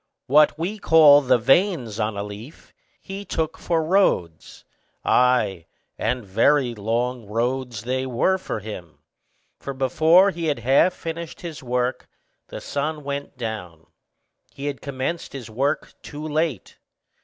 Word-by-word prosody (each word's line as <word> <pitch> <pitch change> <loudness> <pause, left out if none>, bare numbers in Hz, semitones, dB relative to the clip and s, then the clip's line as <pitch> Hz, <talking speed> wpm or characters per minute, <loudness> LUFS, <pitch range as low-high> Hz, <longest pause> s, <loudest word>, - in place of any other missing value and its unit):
What 150 +3 +4
we 190 +7 -3
call 150 -5 +7
the 130 -2 +3
veins 130 - +2
on 105 -1 -1
a 100 - -2
leaf, 105 +9 -11 0.3
he 195 +1 -7
took 160 -4 -2
for 165 -2 0
roads; 155 - 0 0.4
ay, 110 -9 +2 0.3
and 125 -3 -2
very 125 +6 +2
long 115 +2 -2
roads 120 +1 -2
they 130 +2 -2
were 160 +10 +1
for 115 - -5
him; 90 -8 -9 0.6
for 140 - -6
before 160 +9 +4
he 170 -2 -5
had 150 - 0
half 135 +9 +3
finished 165 0 -7
his 165 -4 -7
task, 125 0 -2 0.4
the - - -7
sun 150 +1 -3
went 140 -1 -5
down: 90 -9 -6 0.7
he 140 - -8
had 145 -2 -4
commenced 140 +5 -4
his 125 -5 -8
work 140 +7 -1
too 150 +1 -7
late. 155 - -2
130 Hz, 140 wpm, -23 LUFS, 115-155 Hz, 0.7 s, call